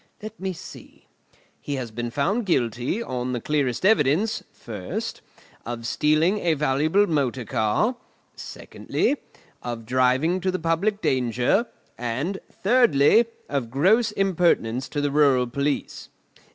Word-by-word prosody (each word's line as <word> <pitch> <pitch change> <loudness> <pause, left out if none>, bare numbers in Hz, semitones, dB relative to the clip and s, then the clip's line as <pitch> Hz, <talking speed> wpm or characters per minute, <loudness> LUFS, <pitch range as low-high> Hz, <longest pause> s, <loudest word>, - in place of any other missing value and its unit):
Let 215 +1 -8
me 190 0 -2
see: 175 - -12 0.6
he 145 - -3
has 125 -4 -5
been 120 +2 -4
found 195 - -1
guilty, 125 - 0
on 125 - -3
the 120 - -1
clearest 140 +2 -1
evidence, 205 +3 +2
first, 105 -6 -6 0.4
of 115 -1 -6
stealing 155 - +2
a 170 -4 +1
valuable 150 +7 +2
motor 135 - -1
car; 110 - +1 0.4
secondly, 290 - -2 0.4
of 120 -2 -5
driving 130 +8 +2
to 185 - 0
the 185 - 0
public 185 +6 0
danger; 125 - +1 0.3
and, 130 +11 -2 0.2
thirdly, 225 - +5 0.2
of 135 -5 -2
gross 195 - +3
impertinence 170 - +1
to 145 - -2
the 145 -1 0
rural 140 -4 +4
police. 140 +4 -3
145 Hz, 125 wpm, -24 LUFS, 125-190 Hz, 0.6 s, thirdly